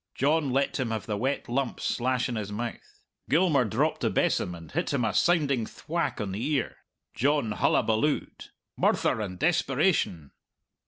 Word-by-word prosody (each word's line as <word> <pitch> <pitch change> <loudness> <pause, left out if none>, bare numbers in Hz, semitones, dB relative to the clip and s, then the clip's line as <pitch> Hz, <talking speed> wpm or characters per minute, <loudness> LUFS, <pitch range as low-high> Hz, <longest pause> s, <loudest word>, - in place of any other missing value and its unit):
John 150 +1 +2
let 135 +3 0
him 130 -3 -1
have 110 -3 -3
the 105 - -2
wet 130 +7 -1
lump 130 +1 -1
slash 125 +1 0
in 120 - -3
his 105 -2 -4
mouth. 115 +3 -6 0.3
Gilmour 150 -3 +3
dropped 105 - 0
the - - +2
besom 90 - 0
and 85 -1 -12
hit 175 +5 -1
him 125 -4 +1
a 110 - 0
sounding 145 -9 +2
thwack 170 +2 -3
on 105 -3 -3
the 100 +5 -4
ear. 140 -3 -1 0.4
John 140 -3 +1
hullabalooed. 110 +7 0 0.3
Murther 110 - +1
and 95 -3 -5
desperation! 80 -3 +1
125 Hz, 160 wpm, -27 LUFS, 110-140 Hz, 0.4 s, Gilmour